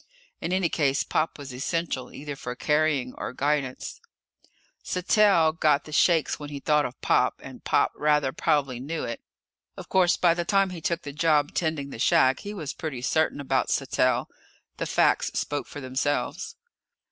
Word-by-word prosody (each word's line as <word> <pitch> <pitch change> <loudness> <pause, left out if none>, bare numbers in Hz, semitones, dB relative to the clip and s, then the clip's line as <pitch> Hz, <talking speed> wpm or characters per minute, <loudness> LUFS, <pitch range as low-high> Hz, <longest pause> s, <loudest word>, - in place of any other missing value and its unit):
In 170 - -3
any 185 -1 +2
case 140 -4 +1
Pop 160 - -1
was 140 -3 -8
essential, 135 0 -3
either 145 0 -7
for 125 -2 -6
carrying 150 -3 +1
or - - -4
guidance. 140 -1 -2 0.8
Sattell 180 -3 +3
got 150 -3 +2
the 155 - -12
shakes 165 +1 +2
when 145 -1 -7
he 145 -1 -6
thought 150 +1 +2
of 125 - -13
Pop, - - +2
and - - -11
Pop - - +2
rather 150 -3 +1
probably 135 -4 0
knew 150 +5 -4
it. 115 - -5 0.6
Of - - -9
course, 185 -2 +3
by 175 -2 +4
the 175 0 -2
time 195 +1 +2
he 175 -2 -7
took 170 +1 -1
the 145 - -7
job 150 -1 +2
tending 155 -4 -2
the - - -8
shack, 130 +3 +4
he 205 - -7
was 155 -8 -5
pretty 140 -6 -5
certain 155 +3 +1
about 135 -1 0
Sattell. 130 -2 +1 0.5
The - - -3
facts - - +2
spoke 145 -1 -2
for 145 - -8
themselves. 130 +3 -2
150 Hz, 170 wpm, -26 LUFS, 135-165 Hz, 0.8 s, by